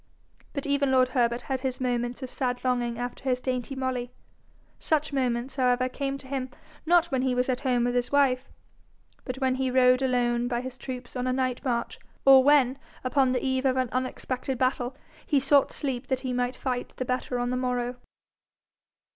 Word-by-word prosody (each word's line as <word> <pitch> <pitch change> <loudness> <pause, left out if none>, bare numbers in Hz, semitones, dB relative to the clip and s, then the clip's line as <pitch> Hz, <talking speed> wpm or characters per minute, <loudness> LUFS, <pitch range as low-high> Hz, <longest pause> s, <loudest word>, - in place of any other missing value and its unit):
But 280 - -4
even 280 -1 +1
lord 255 -1 +4
Herbert 240 -2 +1
had 265 -1 -3
his 255 -1 -3
moments 245 0 -2
of 255 - -6
sad 250 -2 -2
longing 245 -2 0
after 245 +1 -5
his 255 -2 +1
dainty 255 +1 -3
Molly. 255 -2 -2 0.7
Such 305 -1 0
moments, 255 0 -1
however, 255 0 +2
came 275 +1 -3
to 270 - -13
him, 260 -1 -3 0.4
not 345 -1 +4
when 260 -1 +1
he 255 -1 +1
was 250 +1 0
at 250 - 0
home 250 -3 +1
with 245 0 +1
his 245 0 0
wife, 270 -2 +2 0.8
but 255 - -3
when 265 -1 +1
he 260 0 0
rode 255 0 +4
alone 245 -2 +1
by 240 -1 -1
his 260 0 -7
troops 255 -1 -7
on 250 0 -2
a - - +2
night 255 -1 -1
march, 235 -3 -2 0.3
or 270 -1 +8
when, 275 -2 +4 0.2
upon 260 0 +2
the 255 +1 -1
eve 260 0 0
of 260 -1 +2
an 255 0 0
expected 255 0 -4
battle, 255 0 0 0.3
he 290 - +3
sought 275 +1 +3
sleep 265 -3 -3
that 260 -1 -1
he 255 -2 -3
might 245 +1 -1
fight 250 -2 -3
the 255 - -2
better 250 0 -2
on 245 0 -1
the - - 0
morrow. 250 -1 -1
255 Hz, 195 wpm, -27 LUFS, 245-265 Hz, 0.8 s, or